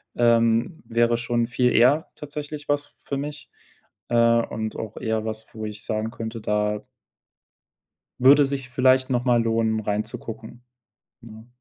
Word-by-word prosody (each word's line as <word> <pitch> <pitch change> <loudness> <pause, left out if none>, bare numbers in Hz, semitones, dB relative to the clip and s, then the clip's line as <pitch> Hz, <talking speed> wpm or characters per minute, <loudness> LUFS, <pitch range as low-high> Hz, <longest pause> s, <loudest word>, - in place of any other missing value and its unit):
ähm, 115 +6 +2
wäre 115 0 +2
schon 120 0 0
viel 125 +1 +1
eher 135 +7 +4
tatsächlich 150 0 -7
was 145 0 -1
für 140 - -3
mich, 145 +1 -6 0.6
äh, 120 - 0 0.3
und 110 -1 -4
auch 110 -1 -6
eher 110 -1 -2
was, 110 0 -4
wo 110 - -5
ich 105 0 -7
sagen 110 +1 -2
könnte, 115 -1 -6
da 105 0 -1 1.4
würde 140 +3 +7
sich 135 -2 -3
vielleicht 130 +1 +3
noch 125 0 0
mal 120 -2 +3
lohnen, 115 -1 +1
reinzugucken, 110 +3 -5 0.6
ne? 110 -1 -13
115 Hz, 140 wpm, -24 LUFS, 110-130 Hz, 1.4 s, würde